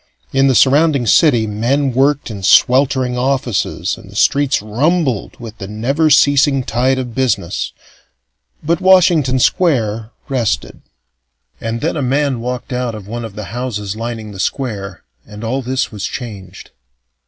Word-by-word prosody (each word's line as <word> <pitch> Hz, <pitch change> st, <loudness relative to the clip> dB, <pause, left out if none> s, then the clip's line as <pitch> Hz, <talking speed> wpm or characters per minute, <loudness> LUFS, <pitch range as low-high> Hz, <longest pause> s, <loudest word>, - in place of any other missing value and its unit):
In 135 Hz, 0 st, +3 dB
the 130 Hz, -, +2 dB
surrounding 140 Hz, +1 st, +3 dB
city, 120 Hz, -2 st, +4 dB
men 125 Hz, +7 st, 0 dB
worked 140 Hz, 0 st, +1 dB
in 100 Hz, -2 st, -7 dB
sweltering 130 Hz, +3 st, +3 dB
offices 120 Hz, -9 st, -1 dB
and 105 Hz, -4 st, -14 dB
the 100 Hz, -, -14 dB
streets 140 Hz, +5 st, +2 dB
rumbled 130 Hz, -, -1 dB
with 115 Hz, -2 st, -10 dB
the 95 Hz, -, -6 dB
never 135 Hz, +10 st, 0 dB
ceasing 140 Hz, -1 st, +4 dB
tide 130 Hz, +3 st, 0 dB
of 125 Hz, -3 st, -4 dB
business 110 Hz, -9 st, -1 dB, 0.9 s
but 165 Hz, +2 st, 0 dB
Washington 175 Hz, -8 st, +4 dB
Square 115 Hz, -, +1 dB, 0.2 s
rested. 130 Hz, -6 st, -2 dB, 0.8 s
And 115 Hz, +1 st, -4 dB
then 160 Hz, -, -1 dB
a 150 Hz, -, -2 dB
man 135 Hz, 0 st, 0 dB
walked 125 Hz, +1 st, -5 dB
out 125 Hz, -2 st, -2 dB
of 105 Hz, -2 st, -10 dB
one 120 Hz, +2 st, -5 dB
of 110 Hz, -3 st, -8 dB
the 105 Hz, -, -6 dB
houses 105 Hz, -5 st, -4 dB
lining 115 Hz, -1 st, -5 dB
the 95 Hz, -, -10 dB
square, 100 Hz, -5 st, -4 dB, 0.2 s
and 105 Hz, +1 st, -10 dB
all 130 Hz, +4 st, -2 dB
this 130 Hz, +1 st, -2 dB
was 105 Hz, -3 st, -5 dB
changed. 105 Hz, -7 st, -8 dB
125 Hz, 150 wpm, -16 LUFS, 110-140 Hz, 0.9 s, city